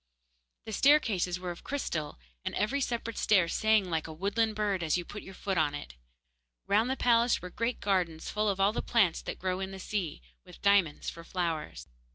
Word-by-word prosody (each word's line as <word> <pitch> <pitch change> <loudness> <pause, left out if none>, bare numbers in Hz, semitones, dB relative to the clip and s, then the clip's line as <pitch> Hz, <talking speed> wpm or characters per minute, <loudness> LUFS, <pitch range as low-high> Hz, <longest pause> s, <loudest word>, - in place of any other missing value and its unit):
The 220 - -6
staircases 205 -10 +3
were 180 -1 -4
of 170 - -10
crystal, 165 - -3 0.3
and - - -3
every 265 +7 0
separate 230 -3 -2
stair 190 -5 +4
sang 215 0 +2
like 160 -1 -1
a - - -7
woodland 210 +6 0
bird 205 -3 0
as 160 0 +1
you 175 - -4
put 210 - -8
your 190 - -11
foot 190 -3 -1
on 145 -2 +1
it. 105 - -8 0.7
Round 220 +5 +2
the 265 - +1
palace 235 0 +3
were 180 - -8
great 230 +5 -2
gardens 180 -5 0
full 210 0 0
of 195 -1 -1
all 195 +2 +4
the - - -1
plants 200 -8 +2
that - - -5
grow 185 0 -2
in 190 0 -3
the 195 - -8
sea, 190 -5 -3 0.2
with 180 -2 -14
diamonds 200 -7 +3
for 165 - -11
flowers. 165 - -3
195 Hz, 205 wpm, -30 LUFS, 175-220 Hz, 0.7 s, stair